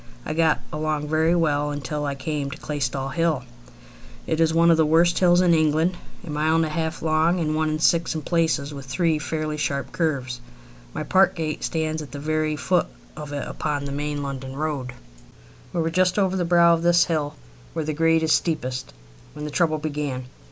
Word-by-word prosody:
I 155 - -2
got 160 -1 +2
along 150 -1 -2
very 160 +2 +3
well 150 -3 +1
until 145 +1 -3
I 140 - -2
came 140 +1 -3
to - - -7
Claystall 135 -2 -3
Hill. 165 -5 +1 0.8
It 160 - -1
is 160 -1 +4
one 170 +1 +4
of 165 - +4
the 160 - +4
worst 170 +3 +4
hills 175 -1 +5
in 175 -2 +4
England, 160 +2 +2 0.3
a 160 - -6
mile 155 +2 +1
and 165 0 +3
a - - -3
half 160 0 -3
long 160 +3 +2
and 155 -2 0
one 155 0 +1
in 155 - -1
six 165 +1 +2
in 155 - -4
places, 160 -4 0
with 140 -2 -8
three 155 +4 +1
fairly 155 0 -3
sharp 140 -2 -2
curves. 130 -7 -2 0.5
My - - -4
park 190 0 +3
gates 155 -2 -2
stand 160 -1 -2
at 150 - -8
the 145 - -6
very 155 +1 0
foot 180 +3 +1 0.3
of 150 -1 -7
it 145 -1 -4
upon 145 -2 -3
the 140 - -4
main 145 0 -3
London 135 -1 -5
road. 140 -4 -3 0.8
We 175 - -1
were 165 0 -1
just 185 +2 +2
over 190 -2 +2
the 180 -2 0
brow 170 0 +5
of 165 - 0
this 175 0 +4
hill, 155 -4 -2 0.4
where 160 - -2
the 155 - -2
grade 165 +1 +3
is 160 - +1
steepest, 130 - -2 0.4
when 150 0 -6
the 150 - -5
trouble 160 -1 +1
began. 145 -4 -3
155 Hz, 205 wpm, -24 LUFS, 145-165 Hz, 0.8 s, hills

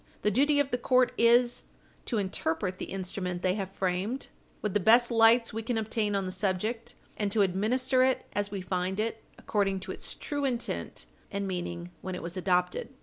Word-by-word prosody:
The 210 - +3
duty 285 +6 +3
of 280 -1 +1
the 245 - 0
court 255 0 +3
is 240 +1 +4 0.4
to 235 - -1
interpret 185 -1 -1
the - - -3
instrument 180 -1 -4
they 185 - +3
have 195 -2 -4
framed 195 +7 -2 0.3
with 210 -3 -1
the 210 - +3
best 235 +5 +5
lights 230 0 +5
we 225 - -2
can 225 +1 -2
obtain 220 -1 0
on 195 -1 0
the 185 - -3
subject, 205 +5 -2 0.2
and 205 -2 0
to 210 -1 +4
administer 250 +8 +1
it 260 0 +2
as 205 0 -1
we 200 -2 -4
find 185 +1 -2
it, 225 +1 -2 0.2
according 195 -2 0
to - - -6
its - - -5
true 290 -1 -3
intent 250 -3 -2 0.2
and 200 -1 -3
meaning 175 -1 -4
when 185 -1 -4
it - - -6
was 170 +2 -5
adopted. 180 +3 0
205 Hz, 195 wpm, -29 LUFS, 185-235 Hz, 0.4 s, best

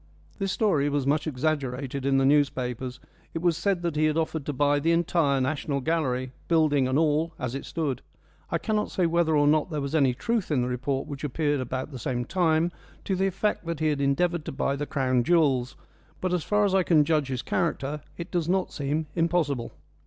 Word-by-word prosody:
This 195 -1 -1
story 155 -11 +2
was 145 -2 0
much 150 +3 +1
exaggerated 140 -2 -2
in 135 -1 +3
the 135 - +3
newspapers; 130 -3 +1 0.4
it 165 - -2
was 175 -2 +3
said 180 0 0
that 170 -3 -1
he 155 +1 +2
had 155 0 +1
offered 160 -2 -2
to - - 0
buy 145 +1 +2
the 165 +4 +1
entire 165 -4 +2
National 140 +1 -1
Gallery, 130 -4 -1 0.2
building 155 -5 +3
and 130 +1 +1
all, 160 +1 +1
as 125 -1 -3
it 135 - -5
stood. 145 -6 -2 0.5
I - - +1
cannot 215 -2 -1
say 180 - 0
whether 165 -2 +2
or 145 - +4
not 150 +3 +3
there 155 -3 -2
was 140 0 -4
any 135 -6 +3
truth 230 - -1
in 135 -5 +1
the - - -1
report 130 +2 -2
which 140 0 -7
appeared 145 0 0
about 130 +3 -4
the 130 - -7
same 120 +1 -2
time, 170 -1 +2 0.3
to 190 - -1
the 190 +1 +1
effect 195 -1 -1
that 170 -2 -3
he 155 -1 +2
had 145 -2 -1
endeavoured 165 +4 +1
to - - -4
buy 140 0 -1
the 145 +1 -4
Crown 130 -3 +1
jewels; 135 -5 +2 0.4
but, 185 -1 -1
as 175 -3 0
far 210 0 +2
as 195 - +1
I 190 - +4
can 160 -4 +4
judge 155 -3 +1
his 130 -1 -3
character, 150 -4 -1 0.2
it 170 +1 -7
does 175 -2 -1
not 185 0 0
seem 150 +2 -1
impossible. 165 -8 0
150 Hz, 215 wpm, -26 LUFS, 135-170 Hz, 0.5 s, or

